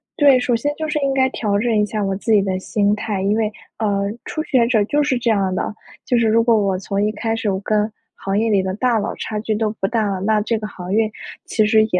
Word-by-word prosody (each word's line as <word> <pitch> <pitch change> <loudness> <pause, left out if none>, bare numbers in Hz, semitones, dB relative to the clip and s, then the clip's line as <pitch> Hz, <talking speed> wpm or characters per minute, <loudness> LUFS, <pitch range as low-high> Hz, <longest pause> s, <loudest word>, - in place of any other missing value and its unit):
对。 280 -3 +5
首 245 -1 +1
先 290 +6 -1
就 315 0 -3
是 305 0 -1
应 275 -1 0
该 265 -1 +3
调 210 -5 -1
整 230 +1 +1
一 210 - +3
下 210 +1 -3
我 195 0 -1
自 220 +4 -2
己 210 - +5
的 190 -1 -1
心 205 +1 +1
态， 210 -2 -3
因 200 +2 +2
为， 220 -1 0 0.3
呃， 200 -3 0 0.2
初 310 - -3
学 255 -6 +2
者 225 -4 +3
就 295 +7 +1
是 270 -3 +1
这 235 -1 +1
样 195 -3 +1
的， 190 - -2 0.3
就 245 - +2
是 230 - +2
如 225 +1 +4
果 230 -1 +4
我 195 -3 +1
从 195 +2 -2
一 210 - +1
开 225 +1 -2
始， 225 -2 -1
我 190 -1 -1
跟 215 0 +1 0.2
行 195 +1 -1
业 225 +1 +1
里 200 -3 +3
的 185 0 -2
大 240 +1 +1
佬 205 - -3
差 215 - -4
距 220 0 -1
都 215 0 0
不 195 - +2
大 225 -2 0
了， 195 -2 -2
那 215 +2 +2
这 225 +2 0
个 215 - -5
行 180 -2 -6
业 220 0 +2 0.3
其 215 - +1
实 215 +1 +4
也 180 - +2
215 Hz, 295 characters per minute, -20 LUFS, 200-235 Hz, 0.3 s, 对